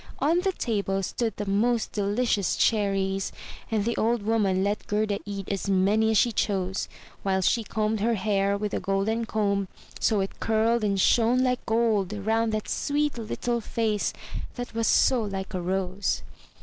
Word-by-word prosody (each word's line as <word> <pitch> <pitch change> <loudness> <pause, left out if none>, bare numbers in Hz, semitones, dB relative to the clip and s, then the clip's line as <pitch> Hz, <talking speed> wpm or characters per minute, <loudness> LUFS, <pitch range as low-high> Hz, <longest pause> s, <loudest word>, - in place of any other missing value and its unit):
On 325 +4 +2
the 385 +1 +1
table 200 - -1
stood 225 +2 -2
the 205 - -3
most 220 +4 +1
delicious 205 0 0
cherries, 195 -3 +1 0.4
and 215 -2 0
the 235 - 0
old 230 -1 +1
Woman 205 -4 +1
let 205 +1 -2
Gerda 210 -1 0
eat 200 -2 -5
as 200 0 -2
many 200 +3 +3
as 220 - +3
she 240 - +4
chose, 190 -3 -1 0.3
while 190 -1 +1
she 230 +5 +2
combed 215 0 -1
her 230 +3 +1
hair 200 0 +1
with 210 0 -3
a - - 0
golden 195 +4 0
comb 200 -3 0 0.3
so 215 - +2
it 195 - -5
curled 225 +1 +2
and 200 -2 +1
shone 240 +5 +4
like 250 -1 0
gold 220 -4 +1
round 220 +2 0
that 215 -1 -2
sweet 290 -3 -1
little 235 +2 -2
face 215 -2 -1 0.4
that 245 -1 -6
was 230 0 0
so 255 -3 +4
like 195 -3 -4
a 185 - -2
rose. 185 +1 -1
210 Hz, 170 wpm, -26 LUFS, 195-230 Hz, 0.4 s, she